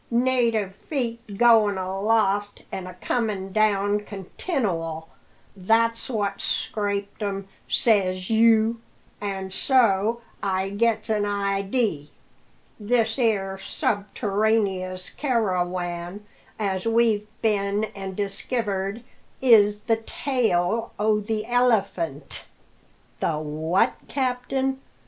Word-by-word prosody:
Native 235 -5 +1
feet 235 -4 -4
goin' 220 -4 +5
aloft 205 +2 0
and 185 -1 -5
a 185 - -9
comin' 200 -1 -2
down 205 -1 +2
continual, 190 - -3 0.5
that's 230 +5 +1
what's 205 -4 -2
scraped 200 0 -2
'em, 195 -1 -3 0.2
says 185 -5 +2
you; 225 0 +4 0.4
an' 195 -2 -4
so 230 -1 +2 0.2
I 190 -1 0
gets 225 +3 +1
an 210 -1 +1
idee. 200 - -1 0.7
This 225 +2 +1
'ere 195 -5 +1
subterraneous 200 -2 -1
carawan 180 - -1 0.3
as 195 -1 -1
we've 225 -2 +2 0.2
been 205 -1 +1
an' 195 -1 -6
diskivered 200 +1 -2 0.4
is 210 -5 +5
the 225 +1 +1
tail 225 -4 0
o' 210 +1 +2
the 215 +1 -2
'Elephant'!" 200 - 0 0.7
"The 155 - 0
what, 155 +4 +1
captain?" 265 0 -1
205 Hz, 95 wpm, -24 LUFS, 190-230 Hz, 0.7 s, goin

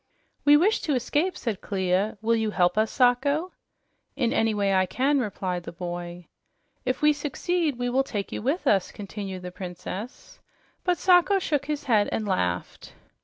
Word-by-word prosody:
"We 290 0 +8
wish 395 +8 +3
to 300 -4 0
escape," 295 +9 0
said 225 -6 -3
Clia. 190 +2 0
"Will 230 +1 +3
you 220 -1 0
help 180 -3 +2
us, 215 +1 +2
Sacho?" 280 +7 +2 0.6
"In 245 -4 0
any 225 0 +2
way 200 -2 +1
I 185 -1 +3
can," 275 +8 +1
replied 190 -6 -2
the - - -8
boy. 175 0 -6 0.6
"If 255 +3 -1
we 300 0 +6
succeed, 300 +1 -1
we 245 0 -2
will 255 +2 +2
take 210 -7 -4
you - - -4
with 280 - -1
us," 195 -3 +2
continued 195 -2 -7
the 180 - -6
Princess. 185 +5 -8 0.4
But 360 -1 +1
Sacho 365 +3 +4
shook 295 -7 -1
his 300 -1 -2
head 220 -6 +2
and 215 - -2
laughed. 90 - -2
225 Hz, 170 wpm, -26 LUFS, 190-290 Hz, 0.6 s, We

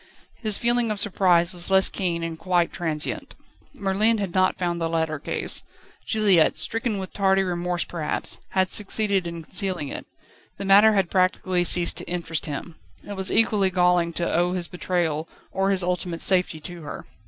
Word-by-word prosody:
His 215 -4 0
feeling 240 -1 +2
of 210 -1 -2
surprise 180 -3 +2
was 175 0 -4
less 190 0 +5
keen, 170 -3 -3
and 165 -1 -5
quite 175 -2 0
transient. 160 -3 -3 0.4
Merlin 205 +3 +1
had 195 -4 -4
not 185 0 +2
found 175 -2 -2
the 165 - -1
letter 160 -2 -2
case. - - -1 0.5
Juliette, 200 -9 +3
stricken 225 +6 -1
with 190 -1 -7
tardy 195 -1 +2
remorse 175 -1 -2
perhaps, 160 -3 -2
had 185 -1 +1
succeeded 200 -3 +1
in 170 -1 -7
concealing 180 -4 -2
it. - - -7 0.5
The 200 - -5
matter 205 +3 +6
had 195 -4 0
practically 185 -1 +1
ceased 175 0 +6
to - - -4
interest 165 -3 -3
him. 155 +3 -7 0.3
It 205 - -6
was 190 -1 +1
equally 210 -4 +3
galling 180 -2 +2
to 170 +1 -2
owe 175 +1 +1
his 180 -2 -3
betrayal 170 -3 -2 0.2
or 195 0 0
his 195 -2 +1
ultimate 180 -1 -1
safety 180 -4 +1
to 175 +1 -9
her. 150 - -8
180 Hz, 175 wpm, -23 LUFS, 170-195 Hz, 0.5 s, matter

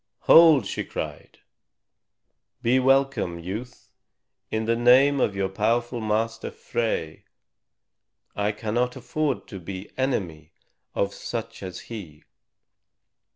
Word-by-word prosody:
"Hold!" 160 -8 +7
she - - -3
cried; - - -7 1.3
"be 125 +3 +4
welcome, 135 -9 +2
youth, 100 +9 -7 0.6
in 110 0 -1
the 115 +1 +2
name 130 +4 +5
of 100 - +1
your 95 -1 0
powerful 115 +5 0
master, 110 +1 -1
Frey. 110 -10 -3 1.1
I 105 0 0
cannot 115 +4 -1
afford 135 +4 -2
to 95 - -7
be 95 +3 -8
enemy 85 - -2 0.4
of 100 0 0
such 115 -1 -6
as 95 -2 -7
he. 90 -10 -9
115 Hz, 110 wpm, -25 LUFS, 100-125 Hz, 1.3 s, Hold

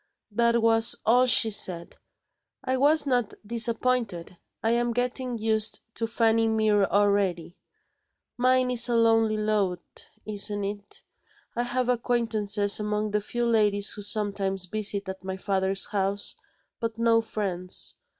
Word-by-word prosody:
That 235 +1 +1
was 225 0 +5
all 250 +3 +4
she 225 -1 +4
said; 175 -4 -1 0.7
I 260 - -1
was 295 +3 +4
not 245 -5 -1
disappointed 230 -5 0 0.3
I 225 - +1
am 240 0 0
getting 250 0 -2
used 220 0 0
to 225 - -2
Fanny 225 0 +1
Mere 215 -2 +2
already. 200 -4 0 0.8
Mine 255 0 +2
is 245 0 +5
a 240 - +1
lonely 225 -1 +2
lot 205 -4 -2 0.2
isn't 205 -1 -1
it? 205 0 -7 0.5
I 240 - -1
have 245 +1 -2
acquaintances 225 -4 +1
among 210 0 -2
the 210 0 0
few 240 +3 -3
ladies 210 -3 +2
who 210 - -7
sometimes 200 -2 -1
visit 205 0 -1
at 190 0 -7
my 190 0 -5
father's 195 0 -1
house, 200 0 -1 0.4
but 230 -1 -4
no 230 0 +3
friends. 185 -5 -4
215 Hz, 135 wpm, -26 LUFS, 200-235 Hz, 0.8 s, was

